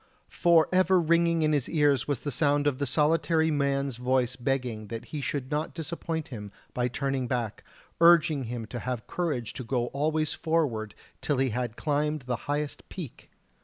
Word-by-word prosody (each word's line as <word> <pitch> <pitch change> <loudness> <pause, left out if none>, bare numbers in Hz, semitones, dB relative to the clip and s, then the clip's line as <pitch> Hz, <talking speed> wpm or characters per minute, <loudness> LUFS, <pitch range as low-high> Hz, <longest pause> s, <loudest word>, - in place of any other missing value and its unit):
For 170 -2 +4
ever 185 0 +4
ringing 170 0 +3
in 155 0 +2
his 140 -4 0
ears 145 -6 +2
was 145 -5 -1
the 145 - -3
sound 145 +2 +2
of 145 -2 +1
the 140 - 0
solitary 160 +3 +2
man's 140 -3 0
voice 125 0 +1
begging 125 -4 -2
that 115 +2 -6
he 150 - -2
should 135 -1 -3
not 150 +1 -2
disappoint 160 -1 -4
him 105 -5 -7 0.2
by 125 0 0
turning 135 +1 -2
back, 120 -4 -2 0.4
urging 165 -5 +5
him 115 -1 -4
to 120 +3 -6
have 125 -2 -4
courage 145 -10 -2
to 130 - -6
go 120 0 0
always 155 +2 0
forward 145 -10 -1 0.3
till 145 - 0
he 130 -1 +1
had 120 0 -3
climbed 150 0 0
the 125 -1 -1
highest 145 0 -3
peak! 165 -10 -8
140 Hz, 175 wpm, -28 LUFS, 125-155 Hz, 0.4 s, urging